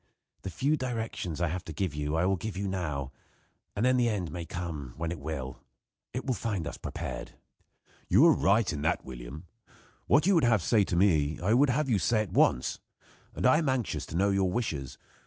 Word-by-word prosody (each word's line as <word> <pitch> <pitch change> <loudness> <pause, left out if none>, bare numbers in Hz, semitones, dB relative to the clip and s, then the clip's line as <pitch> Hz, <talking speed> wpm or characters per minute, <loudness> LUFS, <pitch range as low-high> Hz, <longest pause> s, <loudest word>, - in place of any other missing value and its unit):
The 95 - -5
few 135 - +1
directions 115 - -4
I 85 - +2
have 90 +2 -4
to 80 - -7
give 85 +1 -2
you 75 +1 -2
I 80 +2 +2
will 95 +1 +2
give 100 +2 -5
you 100 +1 -2
now, 75 -8 -3 0.6
and 105 +4 +1
then 130 0 +4
the 120 -1 +3
end 95 -7 -2
may 85 -1 -6
come 80 -8 -5
when 80 0 -2
it 85 - -5
will. 70 -4 -5 0.5
It 125 - -4
will 130 - +1
find 105 -8 -2
us 85 - -5
prepared." 65 0 -6 0.8
"You - - +6
are - - +7
right 100 0 +2
in 75 - -4
that, 80 - 0
William. 65 +5 -8 0.6
What 145 +2 +4
you 190 -3 +5
have 120 - +3
to - - -5
say 110 -4 +4
to 85 - -2
me 80 -6 +2
I 95 +7 +1
would 135 +4 +4
have 140 +4 +1
you 110 -6 +2
say 110 +7 +2
at 100 - -10
once. 60 - +2 0.6
And - - -2
I 130 +5 +6
am 155 -5 0
anxious 130 -5 -1
to - - -7
know 100 +2 +3
your 95 -2 +1
wishes. 75 - -3
95 Hz, 215 wpm, -29 LUFS, 80-115 Hz, 0.8 s, are